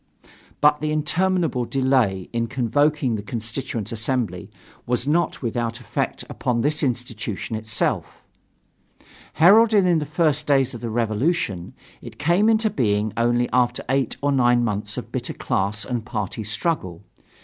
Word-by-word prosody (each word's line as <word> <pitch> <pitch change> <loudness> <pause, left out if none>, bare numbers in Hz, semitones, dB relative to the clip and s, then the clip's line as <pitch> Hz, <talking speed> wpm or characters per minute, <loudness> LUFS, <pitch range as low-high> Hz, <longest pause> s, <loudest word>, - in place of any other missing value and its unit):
But 150 0 +4
the 155 0 -1
interminable 160 -2 +1
delay 125 -8 +1
in 115 0 0
convoking 135 +2 +1
the 105 - -2
Constituent 115 0 -4
Assembly 115 -2 -2 0.4
was 125 +2 0
not 165 -1 0
without 115 0 -2
effect 125 - -3
upon 120 -2 -1
this 150 +4 0
institution 115 - -3
itself. 110 +1 -2 1.1
Heralded 210 +4 +6
in 175 -3 +3
the 150 - -4
first 150 -2 +1
days 135 -3 +3
of 120 - -8
the 120 - -3
revolution, 110 - -1 0.3
it - - -11
came 175 +8 +3
into 220 -1 +2
being 105 - 0
only 120 +1 +2
after 125 -1 +2
eight 135 -2 0
or 145 - +2
nine 120 -2 +3
months 105 -3 -2
of - - -6
bitter - - -3
class 100 +3 -1
and 120 -3 -3
party 110 -2 -4
struggle. 105 - -2
125 Hz, 140 wpm, -23 LUFS, 115-150 Hz, 1.1 s, Heralded